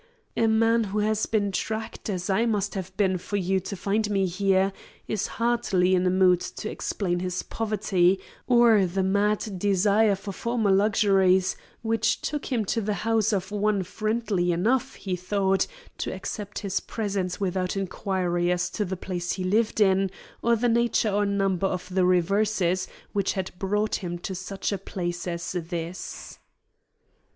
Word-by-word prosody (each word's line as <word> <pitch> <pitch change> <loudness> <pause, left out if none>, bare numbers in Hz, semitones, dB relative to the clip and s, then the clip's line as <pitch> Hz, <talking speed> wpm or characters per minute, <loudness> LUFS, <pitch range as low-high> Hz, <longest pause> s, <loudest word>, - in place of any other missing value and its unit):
A 225 - +3
man 225 +1 +3
who 200 +1 -4
has 215 +1 +1
been 205 -3 +1
tracked 220 +3 -4
as 180 -3 -2
I 200 +5 +2
must 205 -3 0
have 190 -1 -6
been 190 -3 +2
for 205 +3 -3
you 190 0 +1
to 190 +2 -6
find 205 +3 0
me 195 -2 +2
here, 190 +1 +2 0.3
is 210 -2 -1
hardly 230 -6 +2
in 185 0 +3
a - - +4
mood 185 -1 +4
to 215 - -5
explain 175 -4 -2
his 180 0 -2
poverty 195 -4 +1 0.3
or 235 -5 +5
the 190 +2 -1
mad 200 0 0
desire 205 +2 +3
for 195 +1 -7
former 225 0 0
luxuries 190 -2 +3 0.3
which 225 -1 +1
took 295 -2 -3
him 230 -5 0
to 225 +4 0
the 210 0 -1
house 225 -1 +2
of 195 -1 -2
one 205 -1 +1
friendly 215 -2 -1
enough, 240 +10 +1
he 190 -2 -3
thought, 190 +1 +1 0.3
to - - -2
accept 210 -2 -6
his 195 -1 -1
presence 200 -4 -3
without 185 -1 -1
inquiry 180 -2 -1
as 180 0 0
to 210 - -1
the 190 -1 -4
place 175 -1 -3
he 185 - -4
lived 215 +4 +1
in 195 -1 +4 0.3
or 235 0 +3
the 235 +2 +1
nature 235 -2 +2
or 205 +1 +1
number 195 -2 +1
of 180 -1 -4
the 185 -1 +3
reverses 185 0 +2 0.3
which 200 -2 +1
had 190 -1 -3
brought 210 +2 0
him 175 -2 -4
to 185 +2 -5
such 190 +2 -4
a 200 - -2
place 175 -2 -4
as 170 0 -3
this." 170 0 -5
195 Hz, 165 wpm, -26 LUFS, 185-215 Hz, 0.3 s, or